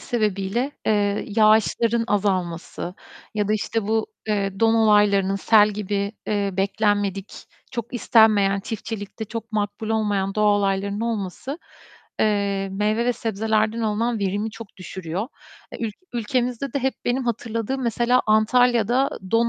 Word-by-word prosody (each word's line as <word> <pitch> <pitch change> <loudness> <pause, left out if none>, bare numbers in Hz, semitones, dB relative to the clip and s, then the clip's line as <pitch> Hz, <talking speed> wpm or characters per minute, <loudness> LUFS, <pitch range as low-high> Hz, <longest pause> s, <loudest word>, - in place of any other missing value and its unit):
sebebiyle, 215 +2 -1 0.2
eee, 205 -1 +1
yağışların 220 +2 +3
azalması 185 -4 -2 0.4
ya 210 -1 0
da, - - +2
işte, 220 +1 -1
bu, 220 0 +1 0.2
eee, 195 -2 -1
don 225 0 +4
olaylarının 205 -3 +4
sel 210 +1 +5
gibi, 200 0 -2
eee, 205 -2 0
beklenmedik, 200 0 0 0.4
çok 240 0 -5
istenmeyen, 210 -4 +4
çiftçilikte 220 0 -6
çok 230 +1 -7
makbul 210 0 -2
olmayan 205 -3 0
doğa 210 -1 +3
olaylarının 200 +1 -1
olması, 230 - -3 0.6
eee, 200 -2 +1
meyve 210 +4 0
ve 245 - +3
sebzelerden 220 0 0
alınan 225 +2 0
verimi 205 +2 -1
çok 220 -2 -11
düşürüyor. 185 +3 -5 0.4
E, - - -4
ül 215 - -5 0.2
ülkemizde 245 +2 -1
de - - 0
hep 265 0 0
benim 250 +2 0
hatırladığım 235 +2 -2
mesela 240 +1 +2
Antalya'da 240 +3 +3 0.2
don 230 +1 +3
215 Hz, 130 wpm, -23 LUFS, 200-230 Hz, 0.6 s, sel